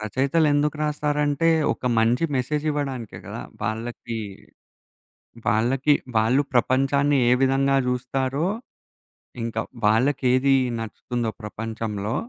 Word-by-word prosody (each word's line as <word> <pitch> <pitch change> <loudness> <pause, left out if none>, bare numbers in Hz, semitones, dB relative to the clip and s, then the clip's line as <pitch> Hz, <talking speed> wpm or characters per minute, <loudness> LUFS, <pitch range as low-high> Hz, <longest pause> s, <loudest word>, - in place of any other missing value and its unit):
రచయితలు 135 +8 +1
ఎందుకు 150 +1 +1
రాస్తారంటే, 150 +1 +1 0.3
ఒక - - -27 0.2
మంచి 115 +7 +2
మెసేజ్ 150 +4 -1
ఇవ్వడానికే 135 -6 -4
గదా! - - -6 0.2
వాళ్ళకి 115 +1 -4 1.3
వాళ్ళకి 125 +7 +3 0.2
వాళ్ళు 115 +6 +3
ప్రపంచాన్ని 135 +4 +2
ఏ - - +5
విధంగా 135 +1 +3
జూస్తారో, 130 +4 -1 1.0
ఇంకా 115 -1 -2 0.3
వాళ్ళకేది 130 +3 +3 0.2
నచ్చుతుందో 115 +1 -3
ప్రపంచంలో 110 -1 -4
130 Hz, 95 wpm, -24 LUFS, 115-145 Hz, 1.3 s, ఏ